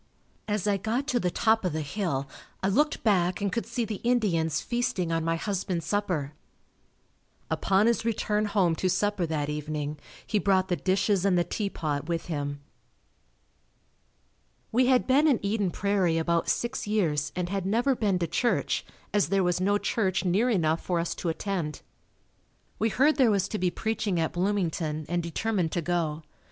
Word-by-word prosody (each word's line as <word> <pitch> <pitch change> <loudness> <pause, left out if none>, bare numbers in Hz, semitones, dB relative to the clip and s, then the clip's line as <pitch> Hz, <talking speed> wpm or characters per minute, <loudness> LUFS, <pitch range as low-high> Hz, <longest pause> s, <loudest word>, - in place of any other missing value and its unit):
As 210 -3 -1
I 205 -1 +2
got 225 +7 -1
to 250 - +2
the 180 - 0
top 220 +5 +2
of 180 -4 -1
the 155 - -1
hill 145 -4 -2 0.4
I 190 - +2
looked 295 +9 +1
back 185 -5 +2
and 200 -2 -1
could 230 - -2
see 235 0 -2
the 215 -2 -5
Indians 175 -10 +1
feasting 240 -8 -1
on 165 0 0
my 165 0 +1
husband's 180 -2 -2
supper. 175 -6 -1 1.2
Upon 195 +2 +2
his 235 -1 +2
return 215 -2 0
home 195 -5 +2
to 185 - 0
supper 205 -2 0
that 150 -2 -1
evening, 150 0 -4 0.3
he 210 - +1
brought 190 -2 +2
the 175 - +2
dishes 190 +1 +1
and 195 -3 +3
the 175 - +3
teapot 155 -8 -3
with 165 -1 -1
him. 145 -1 -3 2.1
We 250 +2 +3
had 255 -1 +4
been 280 +4 +4
in 275 -6 +4
Eden 200 -1 0
Prairie 185 -2 +1
about 165 0 +1
six 240 -2 -1
years 165 -9 0
and 180 -1 -2
had 195 -1 -2
never 240 +6 +2
been 205 -5 +1
to 175 - 0
church 205 +9 0 0.3
as 205 -7 +2
there 195 0 +2
was 180 0 +1
no 205 +2 +3
church 195 -3 0
near 200 +8 +2
enough 165 -7 +1
for 175 -2 0
us 170 - -1
to 175 - -3
attend. 165 -2 -3 1.0
We 225 - +2
heard 290 +8 +3
there 260 -5 +5
was 200 -2 +2
to 215 - -3
be 180 0 +2
preaching 215 -2 -1
at 160 - 0
Bloomington, 170 -5 -1
and 175 +1 0
determined 175 +1 -1
to 175 - 0
go. 165 -2 -1
190 Hz, 175 wpm, -27 LUFS, 165-215 Hz, 2.1 s, there